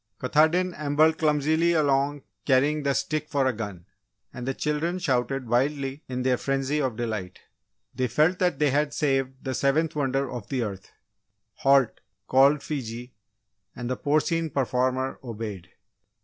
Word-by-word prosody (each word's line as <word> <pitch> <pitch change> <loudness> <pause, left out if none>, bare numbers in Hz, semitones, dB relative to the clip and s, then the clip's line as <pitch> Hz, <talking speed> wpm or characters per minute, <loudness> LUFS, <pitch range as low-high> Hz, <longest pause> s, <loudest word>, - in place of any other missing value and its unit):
Katahdin 160 +7 +2
ambled 155 +2 +2
clumsily 155 +2 +2
along 145 -2 +1 0.2
carrying 145 +3 +2
the 140 -1 0
stick 155 -1 -2
for 140 -2 +1
a 130 - +2
gun, 100 -6 -6 0.5
and 125 0 -6
the 135 - 0
children 155 +4 -1
shouted 135 -5 -1
wildly 135 +3 0
in 125 0 -3
their 130 -1 +2
frenzy 135 +3 -1
of 130 -5 -1
delight. 110 -6 -4 0.6
They 130 0 0
felt 155 +9 +2
that 180 -6 +1
they 150 -1 +2
had 145 +1 0
saved 135 -3 -1
the 130 - -2
seventh 150 +5 +1
wonder 135 -1 0
of 120 -5 -7
the 130 -3 -1
earth! 100 -3 -7 0.7
"Halt!" 135 -3 +3 0.3
called 140 +2 +4
Fiji, 125 -4 -5 0.6
and 125 - -5
the - - 0
porcine 155 +4 0
performer 130 -1 -1
obeyed. 105 -7 -6
135 Hz, 150 wpm, -26 LUFS, 125-150 Hz, 0.7 s, called